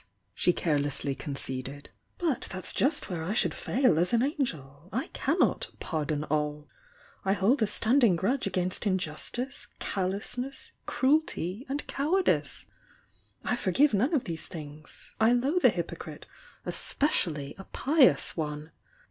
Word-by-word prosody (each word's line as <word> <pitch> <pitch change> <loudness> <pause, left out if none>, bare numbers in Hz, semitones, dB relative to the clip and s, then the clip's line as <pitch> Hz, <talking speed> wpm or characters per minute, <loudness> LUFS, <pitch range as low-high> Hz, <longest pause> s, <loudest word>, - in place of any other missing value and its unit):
she 180 - +3
carelessly 145 -4 +1
conceded. 135 0 -5 0.3
"But 325 -7 0
that's 185 -1 -2
just 285 +3 +1
where 175 -4 -3
I 185 +6 -1
should 235 - +2
fail 250 - +2
as 180 +6 +1
an 235 +1 +4
angel! 165 - -3
I 255 +5 -2
cannot 320 +7 +1
'pardon 155 -2 -2
all.' 150 0 -1 0.6
I 195 - +2
hold 215 +7 +2
a 220 - +4
standing 230 -1 +4
grudge 210 +8 0
against 185 0 -1
injus 180 -6 -1
tice, 260 +3 -4
callousness, 205 +8 -3 0.2
cruelty 260 - +1
and 285 +2 -2
cowardice. 355 +7 +1 0.8
I 245 - +1
forgive 240 +5 +3
none 255 - +2
of 270 - +1
these 165 -2 -5
things. 150 -2 -9
I 225 +2 +6
loathe 275 +9 +2
a - - +10
hypocrite - - -5 0.4
^spe - - -1
ciaUy 150 - 0
a 195 - -8
pious 285 -1 +3
one! 150 -1 -4
195 Hz, 140 wpm, -29 LUFS, -, 0.8 s, a